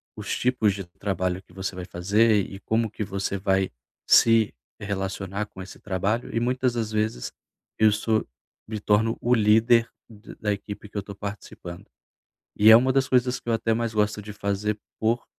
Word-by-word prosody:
os - - -3
tipos 120 -5 +2
de 95 - -6 0.2
trabalho 95 -2 -1
que 90 - -22
você 95 0 -4
vai 90 -1 -6
fazer 100 +4 +2
e 95 - -9
como 110 +1 0
que 105 - -5
você 100 0 -3
vai 95 0 +1 0.4
se 115 -2 +5 0.3
relacionar 100 0 -3
com 95 - -11
esse 95 - -10
trabalho, 105 +6 -2
e - - +2
muitas 125 +1 0
das 115 -2 -2
vezes, 110 - -2 0.5
eu 110 0 +6
sou 110 +1 0 0.4
me 110 0 -4
torno 105 +2 +2
o 120 - +2
líder 115 +2 +4 0.2
d 110 -1 -13
da 105 - 0
equipe 100 +1 -8
que 105 - -8
eu - - +2
estou 100 +1 -10
participando. 100 -3 -8 0.7
E 105 +1 +7
é 110 - +11
uma 130 +2 +2
das 135 -1 +2
coisas 125 -1 +2
que 120 - -7
eu - - +2
até 115 0 +1
mais 115 0 -2
gosto 105 0 0
de 105 +1 -8
fazer 105 +1 -2 0.2
por 115 +2 0
105 Hz, 185 wpm, -25 LUFS, 100-115 Hz, 0.7 s, é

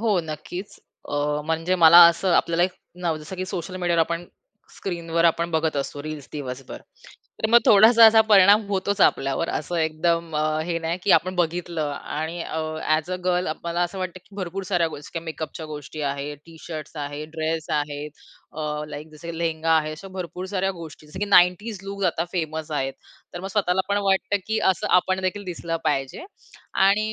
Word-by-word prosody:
हो, 215 -4 +2
नक्कीच. 160 +5 -7 0.3
अ, 145 +1 -1
म्हणजे 165 +3 0
मला 165 +2 +10
असं 170 +2 0
आपल्याला 170 +1 +2
एक 180 +1 +1 0.3
नव 165 -2 0
जसं 155 +5 -9
की 185 - -3
सोशल 185 0 -5
मीडियावर 175 -2 +1
आपण 170 +1 -1 0.5
स्क्रीनवर 170 -2 -2
आपण 170 0 +2
बघत 160 -2 0
असतो 140 +1 -3
रील्स 150 -2 -7
दिवसभर. 135 -3 -6 0.6
तर - - +3
मग 235 - +8
थोडासा 225 +3 +8
असा 220 0 +7
परिणाम 205 +1 +7
होतोच 200 0 -1
आपल्यावर, 135 +2 +2
असं 175 - -3
एकदम 165 +1 0
अ, 150 - +1 0.2
हे 170 0 -1
नाही 165 +1 -2
की 200 - +1
आपण 175 +3 +3
बघितलं 170 -2 -1
आणि 160 +4 -5
अ, 160 - -4 0.3
ॲज 155 +2 +1
अ 185 - -1
गर्ल, 180 0 +1 0.2
मला 170 0 -2
असं 175 +2 -3
वाटतं, 185 -1 -4
की 200 - -20
भरपूर 190 0 -4
साऱ्या 175 -3 +1
गोष्टी 145 -2 -10
किंवा 165 -1 -5
मेकअपच्या 160 0 -6
गोष्टी 150 0 -8
आहेत, 140 +1 -5
टी-शर्ट्स 160 -1 -9
आहेत, 145 +1 -5
ड्रेस 160 0 -2
आहेत, 145 0 -2 0.4
अ, 150 -1 -3
लाइक 150 +1 -8
जसं, 155 +2 -11
की 165 - -7
लेहेंगा 165 -1 -1
आहे, 155 -1 0
अशा 165 +5 -9
भरपूर 180 0 -5
साऱ्या 190 0 +1
गोष्टी 155 -2 -11
जसं, 150 +5 -10
की - - +1
90s 200 +2 +4
लूक 200 0 -4
आता 170 -2 +1
फेमस 160 -2 -3
आहेत. 135 -3 -1 0.4
तर 175 - -5
मग 190 - -5
स्वतःला 190 -2 +1
पण 200 0 +2
वाटतं, 195 +1 +2
की 220 0 0
असं 185 - -5
आपण 185 +1 +1
देखील 195 +2 -2
दिसलं 170 -2 -4
पाहिजे 135 - -1 0.6
आणि 215 +2 +2
170 Hz, 185 wpm, -24 LUFS, 155-185 Hz, 0.6 s, मला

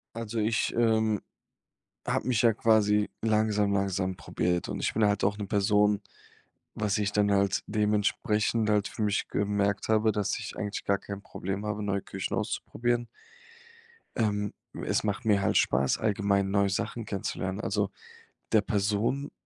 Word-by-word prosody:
Also 115 0 -5
ich, 110 +1 +1
ähm, 110 -3 +2 0.9
habe - - -1
mich 120 -4 +2
ja 115 -2 +4
quasi 105 -2 +3
langsam 105 -2 +2
langsam 95 -1 0
probiert 90 -1 -1
und - - -4
ich - - -1
bin 110 - +3
halt 105 0 +2
auch 100 +1 +2
'ne 105 - -4
Person 105 +1 +2 0.8
was 105 -1 0
ich 105 -1 0
dann 105 0 +2
halt 100 -1 +2
dementsprechend 105 +1 +1
halt 105 -1 +2
für - - -10
mich 105 -1 +1
gemerkt 100 0 0
habe, 110 0 +3
dass 105 -2 -1
ich - - -7
eigentlich 105 0 -4
gar 100 0 +2
kein 100 0 -8
Problem 95 +2 -5
habe, 105 0 -3
neue 100 -1 -1
Küchen 95 -1 -4
auszuprobieren. 120 +2 -1 1.1
Ähm, 105 -3 0 0.3
es - - +1
macht 105 +2 -2
mir 105 -2 +3
halt - - +2
Spaß, 65 +1 +2
allgemein 100 -2 +1
neue 100 0 +3
Sachen 110 +4 -3
kennenzulernen. 95 -1 -3
Also 100 -3 -1 0.6
der 110 - +5
Person 105 +6 0
105 Hz, 155 wpm, -28 LUFS, 100-110 Hz, 1.1 s, der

